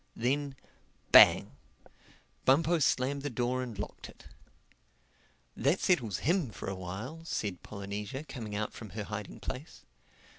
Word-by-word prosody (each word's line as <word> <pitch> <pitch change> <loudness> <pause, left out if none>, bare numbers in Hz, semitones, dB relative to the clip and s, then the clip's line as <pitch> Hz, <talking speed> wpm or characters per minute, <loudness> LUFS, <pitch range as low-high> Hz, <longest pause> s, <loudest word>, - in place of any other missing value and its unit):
Then, 140 +3 0 0.6
bang! - - +8 0.9
Bumpo 160 +5 +4
slammed 140 0 +1
the 145 - -2
door 125 0 -1
and 120 -5 -6
locked 105 - -6
it. - - -16 1.3
"That 140 +9 +2
settles 120 - +2
him 170 -4 +2
for 105 - -8
a 95 - -1
while," 100 - -6
said 100 - -3
Polynesia 100 +6 -5
coming 115 -9 -6
out 105 +1 -2
from 110 - -9
her 105 - -2
hiding 105 0 -6
place. 135 +5 -7
125 Hz, 135 wpm, -31 LUFS, 105-145 Hz, 1.3 s, bang